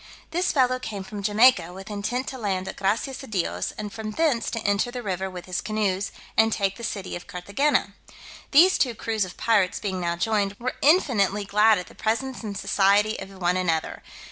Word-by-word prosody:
This 355 +2 +1
fellow 255 -2 +2
came 210 -6 -5
from 205 +1 -7
Jamaica, 205 -4 +4
with 195 +3 -9
intent 220 +6 -2
to 260 - -7
land 190 -4 -2
at - - -5
Gracias 225 +7 -1
a 270 - -10
Dios, 190 -6 -2
and 210 -1 -6
from 220 -1 -5
thence 265 +1 +1
to 230 - -3
enter 205 +3 +1
the 245 0 -6
river 190 -1 -2
with 180 -1 -8
his 185 -1 -3
canoes, 205 -3 -1 0.2
and 225 0 +4
take 195 -2 0
the 235 - -9
city 195 -4 -4
of 175 - -9
Carthagena. 200 +5 0 0.6
These 350 +6 +6
two 245 -4 +1
crews 215 -2 -1
of 185 - -11
pirates 205 -5 +2
being 190 -3 -3
now 170 -1 -1
joined, 200 +2 0
were 255 +1 -2
infinitely 215 - +3
glad 210 +2 +4
at 180 - -4
the - - -16
presence 245 +4 -2
and 205 -3 -5
society 205 +2 +2
of - - -7
one 180 0 +1
another. 165 -3 -1
210 Hz, 200 wpm, -25 LUFS, 190-235 Hz, 0.6 s, These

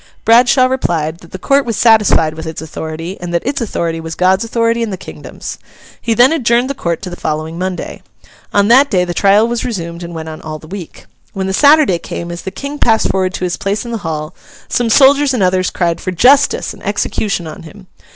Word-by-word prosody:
Bradshaw 245 +3 +5
replied, 170 -11 -1
that 170 - -16
the - - -6
Court 275 +9 +2
was 230 -4 -3
satisfied 210 -9 +4
with 160 0 -8
its 160 - -5
authority, 160 +3 -6
and 175 -1 -5
that 170 - -1
its 275 0 -2
authority 170 -7 -2
was 160 0 -6
God's 190 +3 +2
authority 230 0 0
and 230 -2 -2
the 190 - -4
kingdom's. - - -9 0.4
He 230 - 0
then 250 +7 +5
adjourned 245 -3 +1
the - - -2
Court 170 -8 -3
to 180 - -5
the - - -6
following 155 +1 -4
Monday. 185 0 -4 0.5
On 205 0 +3
that 265 +5 +5
day, 180 -4 +1
the 175 - -4
trial 200 +4 +4
was 240 0 -2
resumed, 170 -7 -5
and 170 -1 -7
went 160 0 -6
on 155 -1 -8
all 155 0 -6
the 155 - -15
week. 180 0 -9 0.3
When 190 -1 -3
the 190 - -2
Saturday 285 - +4
came, 170 0 -6
as 170 0 -6
the 190 - -5
King 280 +8 -7
passed 225 -1 +2
forward 185 -1 -1
to - - -5
his 180 -1 -1
place 200 +3 -2
in 235 - -6
the 230 - -3
Hall, 155 -2 -5 0.3
some 240 -1 0
soldiers 275 +2 +5
and 215 - +1
others 185 0 +1
cried 170 -2 -1
for - - -3
'justice!' 250 +10 +3
and - - -15
execution 195 -5 -2
on 155 - -8
him. 190 +4 -13
190 Hz, 225 wpm, -15 LUFS, 170-235 Hz, 0.5 s, Bradshaw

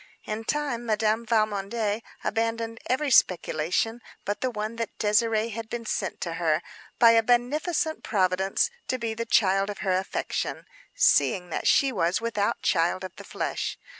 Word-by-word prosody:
In 215 +1 -5
time 280 -5 -1
Madame 220 +1 +1
Valmondé 215 0 0 0.2
abandoned 230 0 -1
every 275 +3 +1
speculation 180 +4 +2 0.2
but 205 +1 -2
the 255 - +1
one 215 0 -4
that 230 -1 -4
Désirée 220 +1 +2
had 225 +1 -6
been 235 0 -5
sent 210 -1 -2
to 170 - -3
her 160 0 +2 0.3
by 230 -1 +7
a 230 0 +5
beneficent 300 +8 0
Providence 190 - +1 0.2
to 255 - -1
be 230 -2 -3
the 230 +1 -4
child 195 -2 +3
of 205 - -5
her 190 - +2
affection, 190 +1 -3 0.3
seeing 190 - +3
that - - -2
she 275 -1 +4
was 180 -5 +1
without 225 -3 -1
child 175 +1 +1
of 185 -1 -7
the - - -9
flesh. - - -3
220 Hz, 160 wpm, -26 LUFS, 195-235 Hz, 0.3 s, by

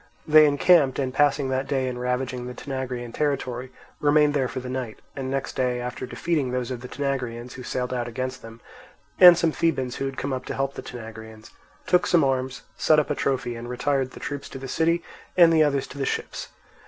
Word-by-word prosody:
They 155 0 +8
encamped, 145 -1 +4
and 130 -2 -1
passing 145 -1 +2
that 130 +1 -1
day 135 -2 0
in 125 -1 -4
ravaging 125 0 -2
the 125 - -7
Tanagraean 125 -4 -5
territory, 130 -4 -2 0.3
remained 150 0 +4
there 135 -3 +1
for 130 - -5
the 125 - -7
night; 125 -3 -4 0.2
and 135 -1 -4
next 135 0 -3
day, 125 -1 0
after 125 +1 -5
defeating 155 -1 -1
those 125 0 -2
of 125 -2 -5
the 125 - -7
Tanagraeans 125 -4 -3
who 130 - -9
sailed 125 0 -3
out 120 -1 -2
against 130 +2 -4
them 115 0 -12 0.6
and 175 -2 +10
some 165 -1 +2
Thebans 135 -7 -1
who 135 - -2
had 135 - -6
come 140 0 -2
up 130 - -4
to - - -4
help 135 0 -1
the - - -7
Tanagraeans, 110 -2 -10 0.3
took 180 - +3
some 170 -3 +4
arms, 130 -1 -1 0.2
set 155 - +4
up 150 - +1
a - - +3
trophy, 130 -3 -1
and 120 +1 -7
retired, 135 +1 0
the - - -12
troops 145 -1 -5
to - - -8
the 135 0 -7
city 165 +5 +1 0.3
and 170 -2 +7
the 160 - +5
others 140 -3 +2
to 140 - -10
the 135 - 0
ships. - - -3
130 Hz, 215 wpm, -25 LUFS, 125-145 Hz, 0.6 s, and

